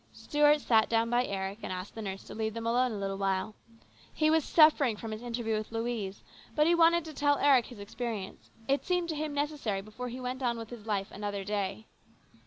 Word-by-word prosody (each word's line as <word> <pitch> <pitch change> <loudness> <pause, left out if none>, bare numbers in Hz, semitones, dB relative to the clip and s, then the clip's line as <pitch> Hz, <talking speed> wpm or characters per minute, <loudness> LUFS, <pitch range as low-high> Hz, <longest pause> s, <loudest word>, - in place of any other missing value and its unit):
Stuart 295 0 +3
sat 220 -4 +3
down 230 0 +1
by 245 +1 +3
Eric, 195 +1 -3
and - - -5
asked 185 +1 -5
the 225 - -7
nurse 195 -2 -5
to - - -10
leave 220 0 -3
them 230 0 -4
alone 245 +2 +2
a 215 - -4
little 195 0 -3
while. 195 +2 0 0.6
He 310 0 +2
was 320 -1 +3
suffering 295 -9 +5
from 225 0 -6
his 215 +1 -5
interview 235 -2 -2
with 215 +1 -4
Louise, 225 -4 -3 0.3
but 300 - +4
he 340 - +4
wanted 340 0 +4
to 315 - -8
tell 290 0 +2
Eric 270 -5 +4
his 245 - -11
experience. 205 -1 -6 0.2
It 275 +1 +1
seemed 355 -1 0
to 315 - -2
him 305 0 -2
necessary 285 -9 -1
before 215 +5 -7
he 250 +2 -6
went 255 +1 -4
on 240 -2 0
with 225 0 -8
his 225 -3 -10
life 200 -1 -1
another 205 -1 -4
day. 205 +1 -3
230 Hz, 220 wpm, -30 LUFS, 205-285 Hz, 0.6 s, suffering